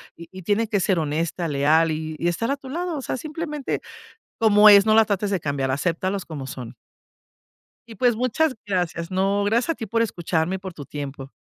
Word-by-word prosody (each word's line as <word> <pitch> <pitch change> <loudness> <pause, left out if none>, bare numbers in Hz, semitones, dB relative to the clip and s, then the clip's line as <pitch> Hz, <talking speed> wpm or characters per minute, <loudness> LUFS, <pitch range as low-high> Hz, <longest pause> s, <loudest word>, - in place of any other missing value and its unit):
y 170 +3 -11
tiene 210 +4 +1
que 205 - +1
ser 185 -2 +1
honesta, 160 +3 -2
leal 155 +3 +3
y 155 0 -4
y 170 - -1
estar 230 +8 -2
a 280 - +1
tu 265 -1 -11
lado. 340 +1 -3
O - - -4
sea, 260 - -3
simplemente 300 -1 -4 0.6
como 210 -1 +7
es, 200 0 +8
no 215 0 +4
la 225 - +7
trates 205 -1 -1
de 195 - +1
cambiar, 140 -3 -1
aceptalos 180 +7 -1
como 140 -5 -7
son. 125 -4 -8 1.1
Y, 225 - -11
pues 245 +2 +2
muchas 255 +5 +1
gracias, 175 -4 -2
no, 195 +2 +1
gracias 230 +8 +1
a - - -3
ti 225 - -6
por 230 +3 0
escucharme 175 -4 -1
y - - -3
por 190 -2 -8
tu 145 -3 -9
tiempo. 140 -2 -7
190 Hz, 205 wpm, -23 LUFS, 160-225 Hz, 1.1 s, es